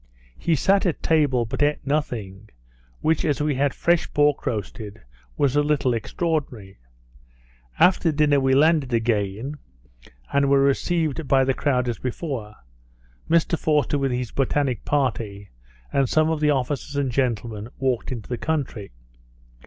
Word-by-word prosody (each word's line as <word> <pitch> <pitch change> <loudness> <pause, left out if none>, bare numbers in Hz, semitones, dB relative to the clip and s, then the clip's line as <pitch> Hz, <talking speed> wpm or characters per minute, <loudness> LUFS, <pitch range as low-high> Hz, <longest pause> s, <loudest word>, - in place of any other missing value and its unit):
He 170 - +1
sat 195 +7 +2
at 170 - -3
table 145 -7 +2
but 135 +5 -4
eat 145 +1 +3
nothing, 110 -9 -3 0.5
which, 160 0 +1
as 145 -3 0
we 150 0 +1
had 140 +1 +1
fresh 170 +4 +1
pork 145 -1 +2
roasted, 105 -1 -4 0.4
was 140 -1 +1
a 145 - +4
little 145 -4 +1
extraordinary. 120 - -3 1.0
After 180 -3 +4
dinner 145 -1 +3
we 135 0 +2
landed 145 -4 +3
again, 115 +4 -1 0.7
and 140 0 +3
were 140 0 +5
received 155 +1 0
by 135 0 +4
the 135 0 +1
crowd 125 -3 0
as 120 - -3
before; 125 -5 -5 0.7
Mr 170 0 +2
Forster 150 -2 +1
with 135 -1 0
his 125 -1 -3
botanical 135 -3 0
party, 115 -8 -2 0.4
and 135 -3 +2
some 155 0 +2
of 160 - -1
the 150 0 +2
officers 140 0 -1
and 140 -3 0
gentlemen, 115 -4 -2
walked 130 -1 -1
into 115 -5 -6
the 120 -2 -4
country. 140 -10 -3
135 Hz, 145 wpm, -23 LUFS, 120-150 Hz, 1.0 s, were